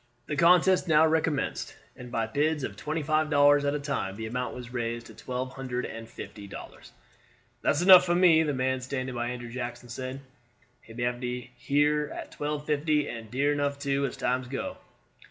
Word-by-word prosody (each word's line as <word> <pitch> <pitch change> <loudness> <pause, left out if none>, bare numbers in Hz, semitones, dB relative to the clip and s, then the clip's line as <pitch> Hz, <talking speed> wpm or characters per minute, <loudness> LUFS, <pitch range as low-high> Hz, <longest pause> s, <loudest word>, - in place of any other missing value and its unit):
The 150 - -3
contest 180 +3 +5
now 155 -1 +6
recommenced, 160 -3 0 0.2
and 125 -1 -10
by 115 -3 0
bids 145 +5 0
of - - -4
twenty 155 +1 -3
five 155 +1 +1
dollars 145 -1 +5
at 145 +1 +1
a - - -1
time 140 -9 -3
the 110 +1 -5
amount 125 +3 -3
was 125 0 -9
raised 120 -1 -3
to - - -12
twelve 130 0 -5
hundred 130 -2 -3
and 115 0 -8
fifty 105 -2 -9
dollars. - - -11 0.7
"That's 155 - +2
enough 185 -1 +10
for 175 -1 +1
me," 175 -3 +6
the 155 -2 0
man 130 -1 0
standing 130 0 -4
by 120 0 -2
Andrew 120 -1 -6
Jackson 120 0 -6
said; 130 +3 -5 0.6
"he 115 - -14
may 120 - -3
have 120 0 -1
her 125 +5 0
at - - -7
twelve 150 0 -3
fifty, 150 0 +1
and 115 -2 -7
dear 140 +4 +1
enough, 145 -1 -1
too, 140 0 -1
as 125 - -8
times 125 +1 -1
go." 135 +1 -4
135 Hz, 190 wpm, -28 LUFS, 125-150 Hz, 0.7 s, enough